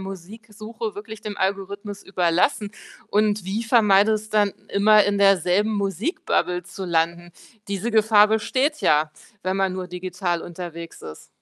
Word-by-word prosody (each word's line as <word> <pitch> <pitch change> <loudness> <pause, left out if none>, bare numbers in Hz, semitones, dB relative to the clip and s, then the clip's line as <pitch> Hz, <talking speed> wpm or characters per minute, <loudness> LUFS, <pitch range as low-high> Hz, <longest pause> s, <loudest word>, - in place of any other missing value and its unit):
Musiksuche 215 +4 -8
wirklich 215 +1 -8
dem 210 -2 -6
Algorithmus 200 +1 -3
überlassen 190 +4 0 0.3
und 210 -1 +1
wie 200 +5 -2
vermeidest 215 -2 +3
dann, 205 -1 +4 0.2
immer, 210 +1 +5
in 200 0 0
derselben 195 +2 +3
Musik-Bubble 195 - -1
zu 190 - -8
landen? 170 0 -1 0.4
Diese 200 +4 -3
Gefahr 215 -1 +5
besteht 255 +8 0
ja, 150 0 +2 0.3
wenn 185 +1 -1
man 195 -1 +1
nur 185 -1 -5
digital 180 -1 -3
unterwegs 170 -1 -8
ist. 75 - -11
200 Hz, 130 wpm, -23 LUFS, 180-215 Hz, 0.4 s, immer